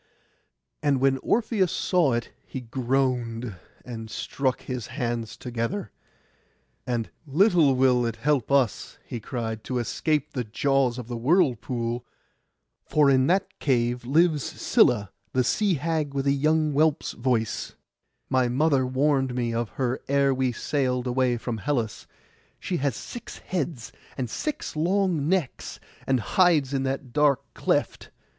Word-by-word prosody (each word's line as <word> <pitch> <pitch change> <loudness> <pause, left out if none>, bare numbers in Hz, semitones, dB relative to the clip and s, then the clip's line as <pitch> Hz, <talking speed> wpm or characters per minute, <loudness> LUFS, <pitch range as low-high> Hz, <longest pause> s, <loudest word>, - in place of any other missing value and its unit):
And 145 -3 +2
when 135 0 +2
Orpheus 210 - +1
saw 170 -8 +2
it 120 0 -2
he 130 - -6
groaned, 125 -2 -1 0.3
and 115 -2 -7
struck 130 +2 -2
his 125 -3 -5
hands 120 -4 -3
together. 120 - -3 1.0
And 120 -3 -2 0.2
'Little 160 -2 +4
will 125 -2 +3
it 115 - -3
help 135 +1 0
us,' 135 -6 +1
he 120 - -5
cried, 110 -1 -4
'to 130 - -3
escape 150 +5 -1
the 125 - -1
jaws 130 +2 +1
of 125 -3 -6
the 120 - -4
whirlpool; 125 - +1 0.8
for 150 -2 +3
in 130 0 +4
that 190 +3 0
cave 120 -2 +1
lives 155 +4 +3
Scylla, 105 -3 +2 0.2
the 130 - +3
sea 200 - +2
hag 155 -1 -2
with 135 0 -1
a 140 - +4
young 155 +2 +2
whelp's 155 +2 +2
voice; 120 -3 -1 0.5
my 130 -1 +2
mother 135 +1 +2
warned 135 -1 +1
me 120 -2 -1
of 115 -1 -1
her 130 -1 -1
ere 140 0 +3
we 130 -1 0
sailed 125 0 -1
away 125 -1 +1
from 115 -1 -4
Hellas; 120 -4 -2 0.5
she 180 - -2
has 140 -5 0
six 240 - -8
heads, 145 -8 -4 0.3
and 125 -4 -3
six 305 - -4
long 170 -2 +1
necks, 185 -7 -1 0.3
and 130 -1 +3
hides 155 - +3
in 135 - +1
that 135 -2 -3
dark 145 -2 +3
cleft. - - -1
130 Hz, 140 wpm, -26 LUFS, 120-150 Hz, 1.0 s, Little